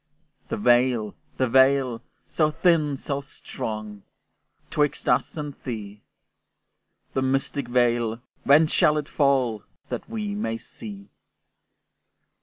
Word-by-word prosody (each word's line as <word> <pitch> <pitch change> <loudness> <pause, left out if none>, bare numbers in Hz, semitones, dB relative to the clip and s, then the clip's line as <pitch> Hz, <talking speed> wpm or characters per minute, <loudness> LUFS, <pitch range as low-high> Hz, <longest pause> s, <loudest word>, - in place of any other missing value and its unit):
The - - -2
veil! 120 -1 +3 0.2
the 130 - +2
veil! 130 -1 +4 0.3
so 155 -2 +2
thin, 155 -3 +2
so 140 +1 -3
strong! 110 -6 -6 0.7
'Twixt 150 -1 0
us - - +1
and 150 -1 -4
thee; 105 -4 -6 1.1
The 130 - 0
mystic 135 0 -1
veil! 120 -2 +1 0.2
when 145 +4 +6
shall 155 -1 +3
it 150 -1 -3
fall, 130 -7 +1 0.3
That - - -5
we 210 -2 -3
may 115 - -2
see? 200 - -10
135 Hz, 110 wpm, -25 LUFS, 120-150 Hz, 1.1 s, when